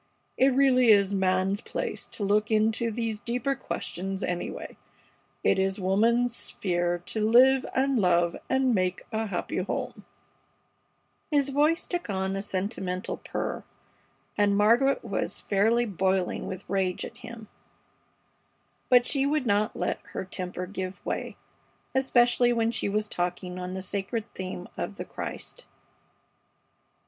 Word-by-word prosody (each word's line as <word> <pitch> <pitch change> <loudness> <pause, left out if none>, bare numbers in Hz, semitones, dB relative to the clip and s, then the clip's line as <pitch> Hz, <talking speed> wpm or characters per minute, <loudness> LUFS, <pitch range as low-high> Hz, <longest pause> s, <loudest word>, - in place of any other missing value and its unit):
It 265 - +4
really 260 -2 +4
is 200 -2 +5
man's 190 +1 +1
place - - -4
to 210 - -5
look 210 +2 +2
into 220 +1 +2
these 225 -1 -2
deeper 245 +5 -1
questions, 195 -6 -4
anyway. 175 -1 -4 0.7
It - - +3
is 195 +1 0
woman's 230 +6 +2
sphere 175 -6 -1
to 220 - -3
live 255 +4 +5
and 265 -1 +2
love 175 -3 +3
and 265 -1 +2
make 185 -2 0
a 220 0 -1
happy 180 -4 -3
home 185 - -3 0.6
" - - -44
His 285 -3 +2
voice 300 +4 +2
took 350 -8 -3
on 190 -1 -1
a 195 - -2
sentimental 190 -1 -3
purr, - - -4 0.7
and 205 -1 +3
Margaret 235 +6 +3
was 200 -4 -2
fairly 225 +4 +2
boiling 190 -2 0
with 190 +1 -7
rage 190 -2 -1
at - - -11
him; 225 -2 -9 1.4
but 245 -1 +6
she 275 +1 +1
would 295 -2 0
not 210 0 +1
let - - -1
her - - -3
temper 180 -1 -5
give 185 0 -6
way, - - -3 0.6
especially 245 -2 +4
when 230 -1 +1
she 210 -3 -1
was 210 +1 0
talking 180 0 -3
on 180 0 -5
the 190 0 -4
sacred 200 +4 -3
theme 185 -1 -6
of 205 - -4
the - - -6
Christ. - - -7
210 Hz, 140 wpm, -27 LUFS, 190-240 Hz, 1.4 s, but